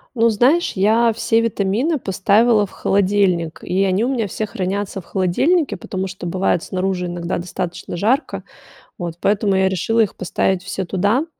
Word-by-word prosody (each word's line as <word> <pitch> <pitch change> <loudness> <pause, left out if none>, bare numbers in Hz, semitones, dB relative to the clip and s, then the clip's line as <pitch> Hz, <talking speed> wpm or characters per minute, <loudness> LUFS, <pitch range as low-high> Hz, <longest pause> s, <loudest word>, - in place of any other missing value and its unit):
Ну, 230 0 +4
знаешь, 260 +11 +2
я 225 +4 +3
все 225 +1 +1
витамины 230 - 0
поставила 210 +1 +2
в - - -19
холодильник, 190 -4 +1
и 190 +2 0
они 195 +3 +1
у - - 0
меня 230 -5 -1
все 215 +3 -3
хранятся 195 0 -3
в - - -17
холодильнике, 210 - +1
потому 190 +1 -4
что 190 -1 -7
бывает 180 -1 0
снаружи 185 -1 -2
иногда 175 0 -3
достаточно 175 0 -5
жарко, 240 - 0 0.6
вот, 170 -2 -5
поэтому 200 -1 +1
я 190 0 +3
решила 225 +5 +1
их 215 - 0
поставить 185 0 -1
все 185 +1 -4
туда. 205 - +1
195 Hz, 165 wpm, -19 LUFS, 185-225 Hz, 0.6 s, Ну